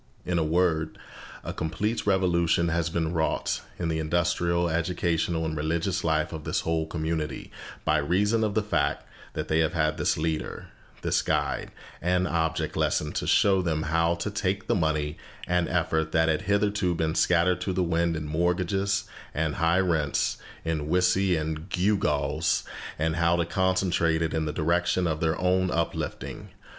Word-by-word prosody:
In 90 -1 0
a - - +2
word, 80 -1 +1 0.5
a - - -4
complete 100 +9 -2
revolution 85 -3 +2
has 85 0 0
been 85 -1 -1
wrought 80 -1 0 0.2
in 85 - -2
the 80 -1 -1
industrial, 85 +1 +1
educational, 85 0 0
and 80 0 -2
religious 85 +5 -1
life 80 0 +1
of 80 -1 -6
this - - -1
whole 80 -1 -1
community 80 -2 -3 0.3
by 80 - +3
reason 105 +9 +2
of 105 -2 -1
the 110 - +2
fact 85 -8 0 0.3
that - - -3
they 80 - +2
have 80 0 +2
had 75 -1 +1
this 75 - +1
leader, 80 0 -3 0.3
this - - +2
guide - - -1 0.3
and 90 +1 +1
object 80 -1 -1
lesson, 75 -1 0
to - - -3
show 95 -2 +4
them 80 -3 -1
how 85 +2 +2
to 85 +5 -3
take 100 -1 -1
the - - +1
money 80 -5 0 0.3
and 90 -1 +1
effort 80 -2 0
that 80 0 +3
had 80 -1 +1
hitherto 100 -2 +1
been 80 -1 0
scattered 90 +1 +3
to 95 - -1
the 90 0 0
wind 85 0 +1
in 80 -1 -4
mortgages 90 +5 0 0.3
and 80 0 -1
high 85 +2 +3
rents, 80 -6 +1 0.3
in 80 -2 -2
whiskey 90 +1 +3
and 80 +2 -3
gewgaws, 80 -5 +1 0.3
and 80 +2 0
how 85 0 +3
to 85 -1 +1
concentrate 90 -3 +1
it 80 - -1
in 80 -1 0
the 75 - -1
direction 85 +4 +1
of 80 -2 -1
their 80 0 0
own 95 0 +2
uplifting. 85 -1 -3
85 Hz, 170 wpm, -27 LUFS, 80-90 Hz, 0.5 s, show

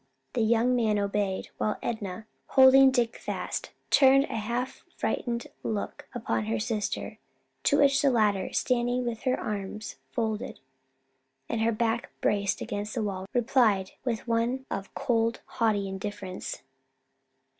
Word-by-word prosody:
The 245 - 0
young 235 +3 +3
man 220 -3 +2
obeyed, 200 -1 -1
while 215 - 0
Enna, 220 -2 -4 0.2
holding 265 0 +7
Dick 240 -3 +1
fast, - - -4 0.2
turned 275 0 +7
a - - -5
half 235 +4 -3
frightened 235 -1 -1 0.2
look 210 -2 -4
upon 115 - -1
her 110 +1 -1
sister; 210 - -3 0.5
to 285 - +4
which 275 -1 +4
the 280 - +4
latter, 210 -6 +2
standing 245 0 +1
with 235 -2 -3
her 255 0 +2
arms 210 +1 -5
folded 220 -3 -2 0.9
and 225 - -1
her 225 +1 +3
back 230 +1 0
braced 200 -1 +1
against 205 +2 -4
the 230 - 0
wall, 190 -2 -3
replied 225 -6 +2
with 235 -3 -2
one 235 +3 0
of 195 0 -4
cold, 230 -3 +1
haughty 215 -4 0
indifference. 190 -1 -5
225 Hz, 135 wpm, -28 LUFS, 205-245 Hz, 0.9 s, holding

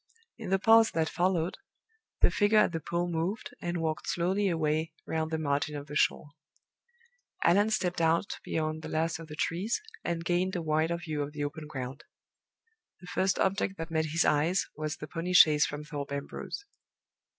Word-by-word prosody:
In - - -6
the 195 - +3
pause 225 +2 +6
that 160 -1 +2
followed, 175 -1 0 0.6
the - - +5
figure 205 +1 +3
at 210 - +5
the 165 - -2
pool 170 +3 -2
moved, 175 +5 -2
and 175 0 -2
walked 160 -1 -2
slowly 190 +4 +1
away 160 -1 0
round 160 0 -1
the 160 - -1
margin 150 0 -1
of 145 -1 -5
the 150 0 -8
shore. 145 - +1 1.1
Allan 205 +5 +4
stepped 180 -5 0
out 165 +4 +1
beyond 155 0 -2
the - - -7
last 160 +1 0
of 165 - -9
the 150 - -8
trees, 180 +9 -1 0.2
and 170 -1 -2
gained 180 +2 +1
a 175 - -1
wider 160 +2 +1
view 155 -3 -4
of 145 +1 -4
the 145 -1 -3
open 150 +1 -5
ground. 135 -2 -6 1.0
The 180 - -13
first 190 0 +2
object 195 0 0
that 165 0 -6
met 160 -1 +1
his 160 +2 +1
eyes 160 +6 +2
was 155 0 -3
the 150 - -7
pony 170 +3 -3
chaise 150 -4 +7
from 145 +1 -6
Thorpe 145 -2 -6
Ambrose. 140 - -5
165 Hz, 185 wpm, -30 LUFS, 155-180 Hz, 1.1 s, chaise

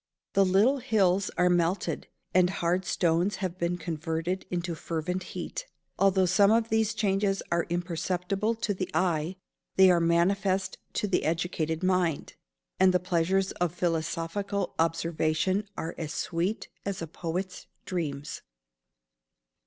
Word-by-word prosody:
The 195 - +5
little 205 +9 +4
"hills 195 -5 +2
are 180 - +4
melted," 175 +1 +1 0.3
and 180 -1 +5
hard 180 0 0
stones 175 +3 +1
have 185 -2 -4
been 170 +1 0
converted 165 +2 -3
into 175 -1 -2
"fervent 170 +3 -3 0.2
heat." - - -5 0.3
Although 190 -1 +4
some 200 +3 +5
of 225 +1 +3
these 220 0 +1
changes 195 -1 +1
are 170 0 +1
imperceptible 180 +5 -1
to 220 -2 -1
the 185 -1 -3
eye, 170 -1 +1 0.4
they 190 -1 +7
are 175 - +4
manifest 185 +3 +1
to 210 - 0
the 195 - +1
educated 160 0 -1
mind; 180 -5 +1 0.5
and 185 -1 +5
the - - +5
pleasures 180 +2 +1
of 175 -1 +1
philosophical 170 +4 -1
observation 165 +4 +1
are 165 - -3
as 155 -2 -4
sweet 180 +5 -1 0.2
as 195 -3 -3
a - - -2
poet's 180 +4 -4 0.2
dreams. 150 -6 -4
180 Hz, 135 wpm, -28 LUFS, 165-195 Hz, 0.5 s, they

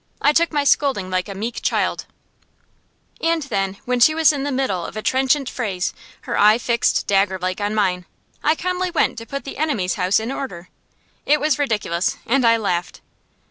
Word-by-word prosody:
I 295 - +3
took 335 +2 +2
my 295 -2 +1
scolding 265 -10 +1
like 185 +1 -1
a 195 - -6
meek 225 +4 -4
child; - - -1 1.2
and 330 -1 +1
then, 195 -7 -2
when 250 0 0
she 310 +6 +5
was 320 -1 +5
in 285 - -3
the 285 +1 -2
middle 255 -10 -1
of 195 - -7
a 215 - -4
trenchant 270 +1 +1
phrase, 195 -9 -3 0.3
her - - -4
eye 210 +2 +6
fixed 235 0 +1
daggerlike 190 -1 0
on 205 +1 -1
mine, 180 -4 0 0.4
I 310 - +3
calmly 365 +2 -2
went 340 - +1
to 230 - -10
put 275 +3 -5
the 275 - -8
enemy's 245 - 0
house 185 +3 +3
in 225 +3 -4
order! 180 -11 -6 0.6
It 300 +1 +4
was 300 -2 +1
ridiculous, 210 -10 -1
and 255 0 +2
I 230 0 +5
laughed. 180 -6 -2
230 Hz, 185 wpm, -21 LUFS, 195-285 Hz, 1.2 s, eye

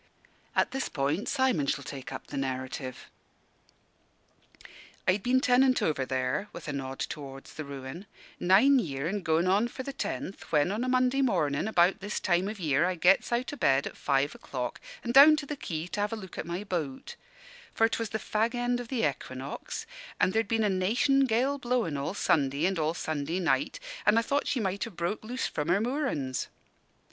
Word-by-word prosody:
At - - +2
this 270 +1 -2
point 145 +8 -1
Simon 260 - +2
shall 140 0 0
take 135 -1 -7
up - - -6
the - - -8
narrative: 130 -1 -4 2.0
"I'd 190 +2 +3
been 250 +4 +3
tenant 255 0 +4
over 140 -4 0
there" 130 +9 -1
with - - -8
a 150 - -2
nod 135 -1 -4
towards 135 -2 -6
the 155 - -5
ruin 140 +6 -8 0.3
"nine 220 +10 +5
year 140 - -2
an' 200 +3 -2
goin' 160 0 +2
on 200 +5 +3
for 260 - -7
the 275 - -5
tenth, 195 - -5
when, 150 +3 +3
on 215 +4 -1
a 255 - -1
Monday 255 +1 +3
mornin', 150 - +1
about 185 -1 +3
this 205 +1 -3
time 180 +1 +1
o' - - -2
year, 155 -7 +1
I 185 0 0
gets 180 +6 +4
out 245 +4 -1
o' - - -6
bed 135 - +3
at - - -6
five 140 +1 +1
o'clock 125 -3 -5 0.2
an' 235 - -1
down 285 +4 +9
to 300 -2 -4
the 295 - -4
quay 165 - -4
to 205 - -4
have 210 +2 -1
a - - 0
look 190 -5 -9
at - - -4
my 175 +4 -3
boat; 160 -9 -4 0.6
for 225 - +4
'twas 230 -1 -2
the 220 - -2
fag 220 +3 -1
end 245 0 0
of 245 - -6
the 235 - +1
Equinox, 130 -1 -6 0.3
and 185 - +3
ther'd 225 -1 +1
been 225 +1 +1
a 210 - +3
'nation 230 +9 +3
gale 260 +4 +1
blowin' 240 - 0
all 140 +7 -3
Sunday 140 -3 +2
and 190 -2 +1
all 155 +1 0
Sunday 155 +2 -2
night, 190 - 0 0.3
an' 210 +2 +6
I 230 - +4
thought 280 +5 0
she 285 - 0
might 195 -2 -1
have 215 -7 -11
broke 170 +6 -2
loose 245 +4 -3
from 150 0 -3
her 180 +3 +4
moorin's. 225 - -1
190 Hz, 200 wpm, -29 LUFS, 145-240 Hz, 2.0 s, down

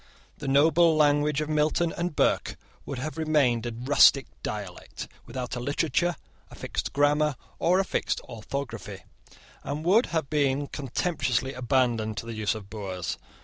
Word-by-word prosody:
The 145 - -5
noble 160 +4 +5
language 150 0 +3
of 150 - -2
Milton 155 +2 +1
and 175 -2 -3
Burke - - +1 0.3
would 140 - -4
have 155 +5 -5
remained 135 -7 +2
a - - -3
rustic 130 +2 +5 0.2
dialect, 100 -4 -6 0.2
without 125 -1 -4
a - - -3
literature, 155 +6 0 0.3
a - - -12
fixed - - -4
grammar, 145 +1 +2 0.2
or 180 +2 +3
a 195 - +1
fixed - - -1
orthography, 130 +4 -6 0.6
and 150 +3 -4
would 210 +7 +4
have 160 -4 -1
been 145 -1 +1
contemptuously 140 -2 -1
abandoned 120 -4 0
to - - -4
the 115 - -5
use 110 +1 -1
of 105 -3 -8
boors. 95 -3 -5
140 Hz, 150 wpm, -27 LUFS, 120-155 Hz, 0.6 s, noble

